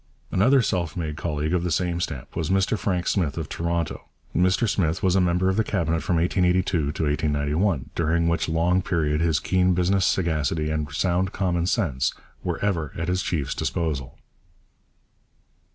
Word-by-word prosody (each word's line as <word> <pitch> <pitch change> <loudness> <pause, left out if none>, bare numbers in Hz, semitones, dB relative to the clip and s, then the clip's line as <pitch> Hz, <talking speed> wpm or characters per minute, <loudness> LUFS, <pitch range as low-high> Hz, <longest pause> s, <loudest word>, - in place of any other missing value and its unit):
Another 125 +7 +4
self 85 -6 -1
made 80 -3 -3
colleague 75 0 -2
of 90 -1 +1
the 90 - -1
same 85 +1 0
stamp 70 -6 -5
was 80 -3 -2
Mr 95 +3 +2
Frank 90 -4 -1
Smith 85 -9 0
of - - -3
Toronto. 85 -1 -3 0.3
Mr 95 +5 +3
Smith 90 -4 0
was 95 -1 +3
a 95 - +4
member 90 +1 +2
of 95 +1 +1
the 110 - +3
Cabinet 85 -6 0
from 90 - 0
1882 90 +2 +2
to 85 -6 0 0.2
1891, 75 +1 0
during 85 +1 +1
which 85 -1 0
long 85 +3 +2
period 80 -4 0
his 80 -2 +2
keen 90 -1 +2
business 90 +2 +2
sagacity 80 -4 0
and 75 -2 -2
sound 90 +5 0
common 90 -3 0
sense 80 - 0 0.3
were - - -2
ever 85 -8 -1
at 85 +2 -2
his 90 +1 +1
chief's 70 -6 -2
disposal. 75 -6 -3
85 Hz, 170 wpm, -24 LUFS, 80-95 Hz, 0.3 s, Another